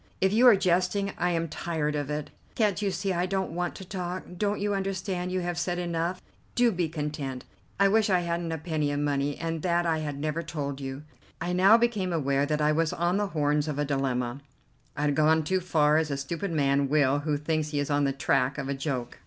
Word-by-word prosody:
"If 190 +1 +2
you 240 +4 +6
are 235 - +9
jesting, 185 +2 +1
I 175 - +2
am 165 -1 0
tired 155 -1 -2
of 145 -1 -2
it. 150 0 -4 0.2
Can't 210 -3 +1
you 205 - +1
see 195 0 -1
I 175 +1 0
don't 190 0 -1
want 175 0 -2
to 190 - -9
talk. 180 -1 -4
Don't 205 +3 -1
you 205 0 0
understand 190 -2 -2
you 185 0 0
have 175 -1 -2
said 175 0 -1
enough? 170 +1 -2 0.3
Do 240 -1 +4
be 175 -4 -1
content. 150 -4 -4 0.3
I 200 - +6
wish 215 +1 +3
I 180 -2 +3
hadn't 170 -1 -2
a 160 - -2
penny 155 -2 -1
of 145 - -1
money, 145 -1 0
and 165 -1 -3
that 175 0 +1
I 160 -1 +1
had 145 -2 -4
never 155 +3 -2
told 145 -4 -4
you." 135 +1 -5 0.4
I 180 - -2
now 195 +5 +6
became 220 -6 0
aware 140 -3 +1
that 150 0 0
I 150 - +4
was 160 0 +1
on 175 +3 +1
the 205 0 0
horns 150 -3 0
of 150 -2 -3
a 145 - 0
dilemma; 135 -2 -1 0.6
I 145 - -1
had 145 -1 +2
gone 155 +1 +4
too 185 +5 +1
far, 155 -4 +3
as 160 -1 +1
a 140 - -2
stupid 165 +8 -3
man 140 -3 +2
will 145 -1 +3
who 145 0 -1
thinks 155 +1 -1
he 150 - -3
is 145 +1 -2
on 145 0 +2
the 140 - +2
track 135 -1 +1
of 140 -2 -3
a 140 - -1
joke. 135 -3 -4
160 Hz, 235 wpm, -27 LUFS, 145-180 Hz, 0.6 s, are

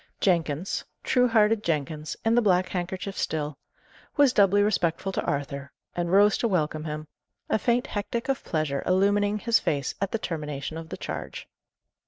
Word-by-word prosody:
Jenkins 170 -2 0 0.2
truehearted 225 -4 +3
Jenkins, 155 -1 -2
in 225 - +4
the 240 - +5
black 185 -3 +3
handkerchief 190 +2 -4
still 150 -2 -2 0.6
was 285 -3 +5
doubly 205 -1 +5
respectful 195 -3 0
to - - -1
Arthur, 140 0 -3 0.2
and 175 -1 -1
rose 200 +2 +5
to 235 - +2
welcome 155 -5 0
him; 155 0 -5 0.4
a - - +3
faint 245 +3 +1
hectic 230 0 -3
of 270 -1 -1
pleasure 155 -4 -1
illumining 205 +2 +3
his 230 +2 +3
face 140 -3 -1
at 200 - 0
the - - 0
termination 150 -6 -4
of 165 0 -7
the - - -6
charge. - - -6
185 Hz, 160 wpm, -26 LUFS, 155-210 Hz, 0.6 s, the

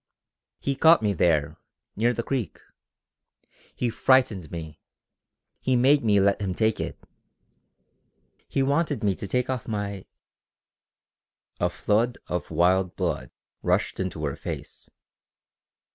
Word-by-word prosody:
"He 140 - -1
caught 160 -1 +6
me 105 -1 +2
there, 80 -3 +1 0.4
near 115 +3 +2
the 115 -1 -3
creek. 125 -7 -3 1.2
He 120 -2 -1
frightened 115 - +2
me. 80 -3 -7 0.8
He 130 - +1
made 135 +4 +4
me 105 -3 +4
let 100 +1 +2
him 95 -3 -2
take 110 +1 +1
it. - - -4 1.5
He 135 - 0
wanted 145 -3 0
me 100 -2 +3
to 100 - -7
take 125 +4 0
off 130 -3 -3
my...." 100 -3 -4 1.5
A - - +2
flood 115 +4 0
of 90 -1 -3
wild 90 +3 +2
blood 80 -9 -2 0.3
rushed - - 0
into 90 -5 -3
her 70 - -2
face. - - -7
105 Hz, 125 wpm, -26 LUFS, 90-125 Hz, 1.5 s, caught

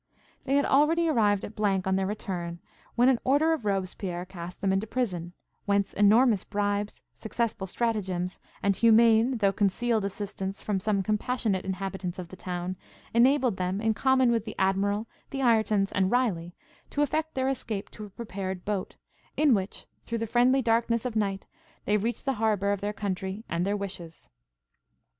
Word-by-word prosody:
They 275 - +1
had 285 - +3
already 320 +5 +3
arrived 210 -8 +2
at 205 - -9
on 190 -2 +1
their 190 0 0
return, 175 -4 -4 0.4
when 245 +1 +4
an 260 -3 +4
order 295 +5 +3
of 300 -9 -4
Robespierre 185 -2 -2
cast 180 -1 -9
them 195 -1 +1
into 195 +3 0
prison, 180 -9 -2 0.3
whence 200 -1 +1
enormous 215 +1 +4
bribes, 205 0 -2
successful 220 -3 -3
stratagems, 190 -5 -2 0.2
and 200 -1 +3
humane, 230 +2 +5
though 200 -3 +3
concealed 220 +2 +1
assistance 195 -1 -4
from 205 -2 -1
some 200 0 0
compassionate 215 -1 0
inhabitants 190 -1 -4
of 180 -2 -7
the 185 - -10
town, 180 0 -4 0.4
enabled 250 -2 +4
them, 185 +2 -1
in 220 0 +1
common 260 +1 +3
with 230 -3 +1
the 215 - -7
Admiral, 200 +3 +1 0.2
the 270 -1 -3
Iretons, 220 -4 +3
and 190 -1 +2
Riley, 190 -9 0 0.3
to 290 - +1
effect 315 +2 -1
their 260 0 0
escape 225 -6 -3
to 215 - -8
a - - -11
prepared 190 -3 -5
boat, 200 -3 -3 0.4
in 300 -3 +5
which, 195 -2 -2 0.2
through 230 - -2
the 225 - -2
friendly 250 +4 +3
darkness 230 0 +1
of 245 -3 -3
night, 195 -3 -1 0.4
they 210 - +3
reached 230 +6 -3
the 270 - +1
harbour 205 -2 +2
of 200 -1 -2
their 205 +1 -1
country 195 +1 -4
and 170 +2 -1
their 205 +1 0
wishes. 180 -5 -7
205 Hz, 170 wpm, -28 LUFS, 190-235 Hz, 0.4 s, humane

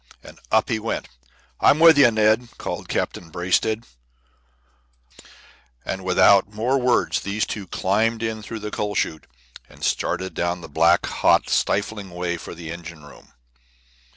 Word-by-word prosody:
And - - -14
up 110 0 +2
he 115 -3 0
went! 115 +1 -4 0.5
"I'm - - +5
with 165 0 +7
you, 140 -4 +6
Ned," 110 +2 +2
called - - -6
Captain 85 - -3
Braisted; 95 +6 0 2.0
and 95 0 -4
without 95 +2 +4
more 120 +6 0
words 125 -1 +1
these 100 +2 -2
two 100 -3 -6
climbed 110 +6 0
in 110 -1 -3
through 110 +1 -7
the 105 0 -5
coal 105 0 -3
chute 80 - -2 0.4
and - - -15
started 95 +2 -1
down 85 0 -2
the 80 - -9
black, 85 +4 +3
hot, - - +2
stifling 100 -1 -1
ways 85 -1 -4
for - - -9
the 80 -1 -8
engine 85 -2 -9
room. - - -17
100 Hz, 150 wpm, -22 LUFS, 85-110 Hz, 2.0 s, with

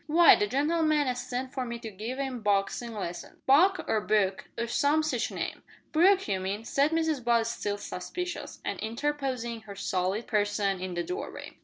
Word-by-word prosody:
"W'y, 335 +2 +8
the 210 - +2
gen'leman 300 +4 +2
as 250 -1 -1
sent 255 +2 -4
for 260 - -2
me 235 -1 -4
to 225 -1 -7
give 220 +6 -5
'im 265 -3 -3
boxin' 205 +3 0
lessons 175 -4 -6
Buck 360 +8 +5
or 215 - +1
Book, 200 -3 +1
or 235 - 0
some 290 +5 +2
sitch 310 - 0
name." - - -4 0.3
"Brooke, 375 +4 +4
you 195 -3 0
mean," 200 +4 -3
said 280 +5 +2
Mrs 320 -4 0
Butt 235 -1 +3
still 205 -3 -2
suspicious, 345 - -5
and - - -2
interposing 245 -1 -2
her 205 -2 -10
solid 190 +3 -1
person 205 -2 0
in 185 -1 -4
the 175 - -1
doorway. 365 +3 -6
235 Hz, 180 wpm, -29 LUFS, 205-295 Hz, 0.3 s, W'y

